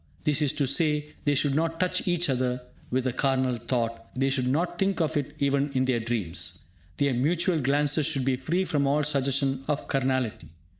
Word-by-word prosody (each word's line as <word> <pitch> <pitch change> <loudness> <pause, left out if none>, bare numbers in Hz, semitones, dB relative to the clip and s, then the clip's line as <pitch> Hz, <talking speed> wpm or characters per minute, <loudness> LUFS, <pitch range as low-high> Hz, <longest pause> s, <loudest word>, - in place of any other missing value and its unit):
That 150 0 +2
is 145 -3 +3
to 145 - 0
say, 150 +1 +1
they 145 -1 +3
should 145 0 +2
not 165 +2 0
touch 185 0 0
each 175 -1 +2
other 125 -2 -1 0.3
with 130 +1 0
a 130 - 0
carnal 130 -2 +1
thought, 115 -1 -3
they 135 +1 +1
should 130 -2 0
not 170 +6 0
think 195 0 +1
of 160 -1 0
it 145 0 -2
even 140 0 +1
in 130 0 +1
their 130 -2 +1
dreams. 110 -7 -2 0.3
Their 140 -2 +2
mutual 165 +6 +1
glances 145 +3 +2
should 140 -5 0
be 135 -1 +2
free 170 +8 -1
from 145 -5 0
all 145 +2 +2
suggestion 140 -2 0
of 150 -1 -2
carnality. 130 - -1
140 Hz, 195 wpm, -27 LUFS, 130-150 Hz, 0.3 s, is